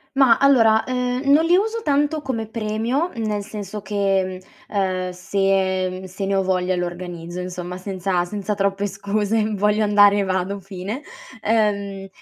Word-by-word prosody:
Ma 265 -4 +6
allora, 225 -6 +5
ehm, 250 +2 -1
non 310 +3 +5
li 345 - +4
uso 445 +3 -1
tanto 295 +1 +1
come 230 -6 -3
premio 230 +9 -1
nel 210 -2 -2
senso 210 0 -7
che, 195 -2 0 0.3
mhmm, - - -11
ehm, 185 -2 0
se, 190 +1 0
mhmm, 185 +1 -7
se 190 +2 -5
ne 195 0 0
ho 195 - +3
voglia 185 -1 0
lo 180 0 -1
organizzo, 175 0 -7
insomma, 180 0 -5
senza 185 -1 -1
senza 205 +2 -3
troppe 200 0 0
scuse: 210 +2 -1
voglio 210 +1 +2
andare? 205 -1 +5
Vado, 190 +1 -1
fine. 195 +7 -6 0.4
Ehm, 200 -3 0
200 Hz, 155 wpm, -22 LUFS, 185-225 Hz, 0.4 s, Ma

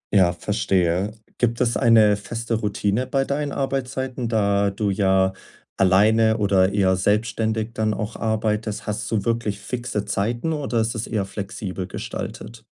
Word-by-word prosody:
Ja, 90 -3 +5
verstehe. 95 0 0 0.2
Gibt 115 -1 +1
es 120 -1 +1
eine 110 -4 +5
feste 115 +3 -4
Routine 105 +2 0
bei 135 -1 +1
deinen 145 0 -2
Arbeitszeiten, 130 -2 -2
da 100 -2 +2
du 100 0 -1
ja 95 -1 +2 0.4
alleine 110 +4 +4
oder 100 -2 +3
eher 95 -2 +3
selbstständig 110 +3 0
dann 110 -1 0
auch 110 0 -4
arbeitest? 110 -1 -1
Hast 105 -1 -3
du 110 -1 -1
wirklich 115 -3 -1
fixe 120 -1 -4
Zeiten 120 +10 -1
oder 140 -6 -1
ist 115 +2 -1
das 110 0 -4
eher 105 -3 -1
flexibel 95 -2 -5
gestaltet? 115 +3 -7
110 Hz, 145 wpm, -23 LUFS, 100-115 Hz, 0.4 s, Ja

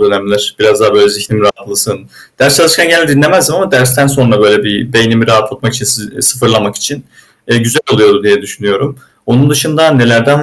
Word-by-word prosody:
dönemler. 100 +1 -2
Biraz 110 - +1
daha 110 - +1
böyle 100 0 +4
zihnim 105 +1 -4
rahatlasın. 105 -1 -2 0.4
Ders 140 +1 +3
çalışırken 165 +1 +3
genelde 165 -1 +2
dinlemezdim 150 +6 +2
ama 190 0 -2
dersten 130 +2 +2
sonra 125 -6 +1
böyle 105 0 +2
bir 105 +4 -4
beynimi 115 0 +1
rahatlamak 115 +2 -1
için, 130 - -5
sı 115 -6 -2
sıfırlamak 110 -6 0
için. 135 +6 -6 0.4
Eee, 120 - +1
güzel 115 +6 -1
oluyor 405 -1 +2
diye 415 -1 +1
düşünüyorum. 120 +8 -5 0.3
Onun 135 +4 +1
dışında 155 +2 +1
nelerden 130 +2 +2
120 Hz, 165 wpm, -9 LUFS, 105-145 Hz, 0.4 s, böyle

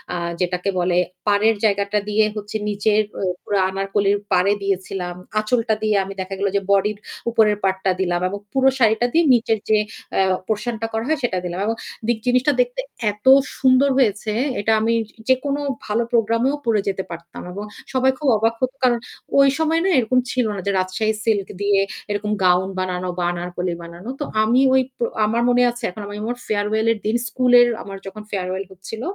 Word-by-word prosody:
আ - - -1 0.2
যেটাকে 180 +2 -1
বলে 175 0 +1 0.3
পাড়ের 210 +2 +3
জায়গাটা 200 0 +1
দিয়ে 215 +1 +3
হচ্ছে 210 +1 -4
নিচের 210 +1 +2 0.2
ও - - -4 0.2
পুরা 205 -1 0
আনারকলির 195 +1 +1 0.2
পাড়ে 185 +3 +4
দিয়েছিলাম। 190 -2 -2 0.2
আঁচলটা 225 0 +1
দিয়ে 215 -1 +2
আমি 195 +1 -7
দেখা 190 +1 -5
গেল 200 - +1
যে 200 - +2
বডির 200 +1 +2 0.3
উপরের 215 -3 +3
পার্টটা 190 0 +1
দিলাম 175 -1 0
এবং 200 +1 -5
পুরো 265 0 +4
শাড়িটা 230 0 +3
দিয়ে 335 +1 +4
নিচের 225 -2 +2
যে 215 - +5 0.4
অ্যা 195 - +3 0.2
পোরশনটা 225 +1 -2
করা 225 +1 -1
হয় 315 -2 +1
সেটা 190 -6 0
দিলাম। 175 +1 -4
এবং 225 +1 0 0.3
দিক 240 -2 +2
জিনিসটা 255 +4 +3
দেখতে 245 +1 -2 0.3
এত 210 +4 -17 0.3
সুন্দর 260 +1 +4
হয়েছে 215 -3 +1 0.3
এটা 220 +2 +1
আমি 230 +1 +2 0.4
যেকোনো 275 +2 +1 0.3
ভালো 220 +2 0
প্রোগ্রামেও 230 +4 +2
পড়ে 215 -3 +2
যেতে 190 -1 -1
পারতাম। 170 0 -9
এবং 200 +3 -6 0.3
সবাই 260 0 +3
খুব 295 - -2
অবাক 225 +2 +1
হত। 255 0 +1
কারণ 240 -2 +4 0.4
ওই 275 0 +7
সময় 320 +1 +2
না - - +3
এরকম 250 +2 +2
ছিল 250 -2 +1
না 190 - -4
যে 200 - +2
রাজশাহী 215 +4 -1
সিল্ক 205 -4 +1
দিয়ে - - -1 0.5
এরকম 210 +1 -2
গাউন 180 +1 +3
বানানো 185 0 -2
বা 180 - -1
আনারকলি 175 0 -3
বানানো। 170 +7 -9
তো 295 - -2 0.2
আমি 240 +4 +3
ওই 265 - +5 0.4
আমার 230 +2 0
মনে 245 0 +4
আছে 240 0 -11
এখন 205 +4 -9
আমি 205 - -7 0.3
ফেয়ারওয়েল 215 +1 0
এর 215 - -9
দিন 220 +2 +1
স্কুলের 245 +1 +5 0.2
আমার 195 -1 -8
যখন 210 +2 -8
ফেয়ারওয়েল 190 0 -2
হচ্ছিল 205 +4 -8
215 Hz, 180 wpm, -21 LUFS, 195-235 Hz, 0.5 s, ওই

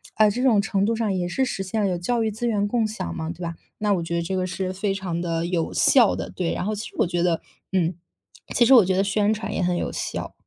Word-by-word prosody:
呃， 215 -1 +5
这 245 - -3
种 230 -6 +4
程 200 -2 0
度 230 +2 +1
上 220 -3 0
也 180 -2 -1
是 260 +10 0
实 195 - -3
现 195 +4 -3
了 200 - +2
有 180 - -1
教 230 +7 0
育 220 - +1
资 230 +3 -3
源 205 -3 +1
共 230 +1 +1
享 215 - -5
嘛， 160 -2 -4
对 175 - -11
吧， 170 -1 -4 0.2
那 210 -1 +2
我 180 - 0
觉 170 +1 -3
得 170 - 0
这 180 +3 -3
个 185 -1 0
是 185 0 -3
非 195 +1 -1
常 185 -3 -3
地 165 -1 -1
有 170 -2 -1
效 240 -6 +5
的， - - -5
对， 175 -3 -2
然 - - -3
后 215 - -1
其 210 +3 -5
实 - - -16
我 - - +4
觉 175 0 -1
得 170 -2 +1 0.3
嗯， 180 -2 +1 0.6
其 240 - +5
实 270 - +6
我 240 -5 +9
觉 190 0 +1
得 195 - +3
宣 205 +1 +1
传 215 - -4
也 - - -1
很 180 0 +1
有 - - -2
效。 - - -4
195 Hz, 310 characters per minute, -24 LUFS, 175-215 Hz, 0.6 s, 我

